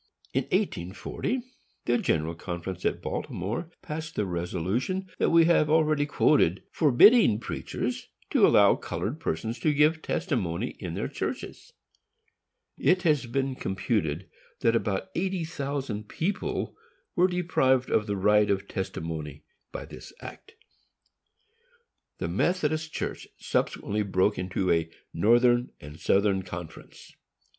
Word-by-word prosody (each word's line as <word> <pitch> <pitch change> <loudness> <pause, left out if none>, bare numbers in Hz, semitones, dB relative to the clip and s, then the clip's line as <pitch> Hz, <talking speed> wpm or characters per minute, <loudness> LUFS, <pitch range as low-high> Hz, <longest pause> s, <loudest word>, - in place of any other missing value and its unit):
In - - +1
1840, 95 - -2 0.4
the 120 0 +2
General 80 +1 0
Conference 90 +2 -6
at - - 0
Baltimore 110 - -3
passed 160 +2 -6
the 105 - 0
resolution 95 - -2
that - - +3
we 165 0 +6
have 165 -3 +4
already 155 -2 +3
quoted, 120 - +3
forbidding 155 - +6
preachers 115 - -4 0.2
to - - +6
allow - - +6
colored 130 +10 -4
persons 115 - -3
to 155 - +2
give 150 +2 +3
testimony 120 - -1
in 85 -4 -5
their - - -2
churches. - - -5 1.1
It 185 0 +3
has 150 -7 +2
been 135 +2 -1
computed 95 - -2 0.3
that 115 0 +3
about 105 -4 -1
eighty 185 -1 -1
thousand 135 -8 -4
people 190 +5 -2 0.4
were 180 +1 +5
deprived 135 -8 +1
of 105 - +2
the 100 -1 -1
right 105 +2 +4
of 100 -1 0
testimony 80 -5 -5 0.3
by - - -6
this - - -11
act. 440 - -11 1.6
This - - -3
Methodist 155 -3 0
Church - - -4
subsequently 105 +1 -1
broke 100 0 +1
into 90 0 -1
a 80 -1 +1 0.2
Northern 120 +6 +4
and 75 +2 -11
Southern 100 -1 +2
Conference. 85 -3 -10
115 Hz, 125 wpm, -27 LUFS, 95-155 Hz, 1.6 s, we